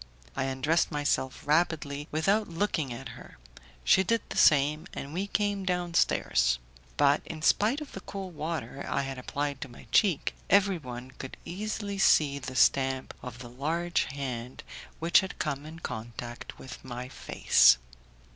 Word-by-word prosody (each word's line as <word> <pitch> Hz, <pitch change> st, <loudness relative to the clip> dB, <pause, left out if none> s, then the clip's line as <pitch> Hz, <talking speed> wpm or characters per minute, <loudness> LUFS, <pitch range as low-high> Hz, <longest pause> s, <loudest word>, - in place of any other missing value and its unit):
I -, -, 0 dB
undressed 135 Hz, +6 st, +1 dB
myself 145 Hz, -3 st, -1 dB
rapidly 150 Hz, -2 st, +1 dB
without 195 Hz, +8 st, +1 dB
looking 165 Hz, -5 st, -1 dB
at 120 Hz, +2 st, -6 dB
her, -, -, -12 dB, 0.5 s
she 190 Hz, -, +5 dB
did 230 Hz, +4 st, +1 dB
the -, -, -6 dB
same, 150 Hz, +3 st, +4 dB
and 140 Hz, +2 st, -6 dB
we 190 Hz, +4 st, -2 dB
came 205 Hz, -1 st, 0 dB
downstairs; 175 Hz, -, +2 dB, 0.4 s
but, 145 Hz, +1 st, +4 dB
in 155 Hz, -2 st, -8 dB
spite 225 Hz, -, +3 dB
of 295 Hz, -, -8 dB
the -, -, -7 dB
cold 190 Hz, -1 st, -7 dB
water 150 Hz, -4 st, -4 dB
I -, -, 0 dB
had 135 Hz, -1 st, -5 dB
applied 140 Hz, +1 st, -3 dB
to 140 Hz, -, -5 dB
my 120 Hz, -, -13 dB
cheek, 180 Hz, -, +3 dB, 0.2 s
everyone 145 Hz, -11 st, +1 dB
could 130 Hz, -, -7 dB
easily 200 Hz, +2 st, -4 dB
see 145 Hz, -6 st, +4 dB
the 130 Hz, -1 st, -7 dB
stamp 130 Hz, 0 st, +2 dB
of 125 Hz, -2 st, -8 dB
the 120 Hz, -1 st, -9 dB
large 165 Hz, +7 st, 0 dB
hand 130 Hz, -3 st, -5 dB, 0.3 s
which 165 Hz, +1 st, +5 dB
had 190 Hz, -, -5 dB
come 145 Hz, -1 st, -3 dB
in 160 Hz, +1 st, -9 dB
contact 120 Hz, -4 st, -7 dB
with 130 Hz, -, -10 dB
my 125 Hz, 0 st, -6 dB
face. 130 Hz, -, +4 dB
150 Hz, 155 wpm, -29 LUFS, 130-175 Hz, 0.5 s, she